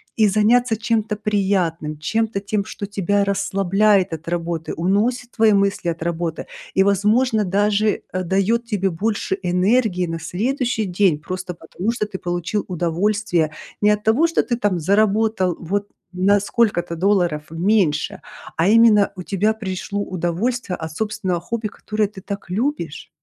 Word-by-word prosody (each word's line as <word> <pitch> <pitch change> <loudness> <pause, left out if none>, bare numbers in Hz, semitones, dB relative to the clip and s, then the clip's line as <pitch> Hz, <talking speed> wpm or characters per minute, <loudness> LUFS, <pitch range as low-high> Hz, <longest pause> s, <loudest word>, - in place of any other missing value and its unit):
и 215 -2 +4
заняться 225 +3 +3
чем-то 220 -1 -1
приятным, 190 -7 0
чем-то 220 +5 -1
тем, 200 +1 -1
что 205 - -6
тебя 200 0 0
расслабляет 195 -1 +2
от 160 +1 -7
работы, 170 -1 -3
уносит 225 +8 0
твои 225 -1 +4
мысли 200 -3 +1
от 165 -1 -4
работы 170 0 -3 0.3
и 190 - +4
возможно 210 +4 +2
даже, 205 +2 +1
э, 185 0 -1
дает 195 +6 +1
тебе 205 -4 0
больше 195 +2 -1
энергии 180 +1 +2
на 165 0 -3
следующий 225 - -1
день 180 -4 +2
просто 185 +2 -5
потому, 175 +6 -4
что 230 -3 -2
ты 200 -2 -6
получил 175 +3 -2
удовольствие. 175 0 0 0.3
Не 210 - +4
от 210 0 0
того, 235 +10 +3
что 330 - +1
ты 240 - -1
там 205 -6 0
заработал 200 0 +2
вот 200 +4 -2 0.2
на 195 +3 +3
сколько-то 200 -5 0
долларов 175 -4 +1
меньше, 170 -3 +1 0.3
а 165 +4 +2
именно 220 -2 +5
у 180 - -5
тебя 205 +4 +1
пришло 200 -1 -4
удовольствие 185 +4 -2
от 160 -1 -6
собственного 210 -3 -2
хобби, 225 +4 -3
которое 215 0 -2
ты 195 -1 -12
так 200 -1 -7
любишь. 200 - -2
200 Hz, 150 wpm, -21 LUFS, 175-215 Hz, 0.3 s, именно